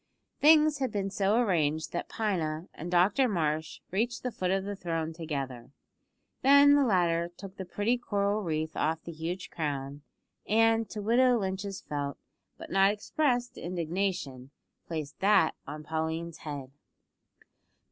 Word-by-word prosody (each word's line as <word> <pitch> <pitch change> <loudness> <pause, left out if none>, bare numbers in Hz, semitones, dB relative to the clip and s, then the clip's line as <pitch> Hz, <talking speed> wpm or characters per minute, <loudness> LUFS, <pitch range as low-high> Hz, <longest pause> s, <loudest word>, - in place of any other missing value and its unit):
Things 305 -1 +6
had 260 -3 -1
been 195 -1 -2
so 200 +2 +2
arranged 160 -8 +1
that 175 - -4
Pina 170 -6 -2
and 170 - -7
Dr 190 +9 +4
Marsh 160 -4 -1
reached 225 +6 -1
the 250 - -2
foot 185 -5 -2
of 190 +1 +1
the 205 +1 -4
throne 165 -3 -3
together. 140 -7 -5 0.7
Then 280 +1 +7
the 285 -1 +5
latter 170 -6 +2
took 195 -1 -9
the 190 - -5
pretty 210 +7 0
coral 205 -2 0
wreath 160 -3 -2
off 160 0 -1
the 170 - -7
huge 170 +3 -5
crown, 145 -2 -3 0.5
and, 225 0 +3
to 210 +1 -5
widow 245 +3 +4
Lynch's 195 -1 -3
felt, 145 -1 -4 0.4
but - - -10
not 195 0 +5
expressed, 245 +2 -1
indignation, 170 -6 -3 0.4
placed 155 -3 -5
that 195 -5 +4
on 150 +2 -7
Pauline's 160 +1 -3
head. 140 -4 -6
185 Hz, 145 wpm, -29 LUFS, 160-215 Hz, 0.7 s, Then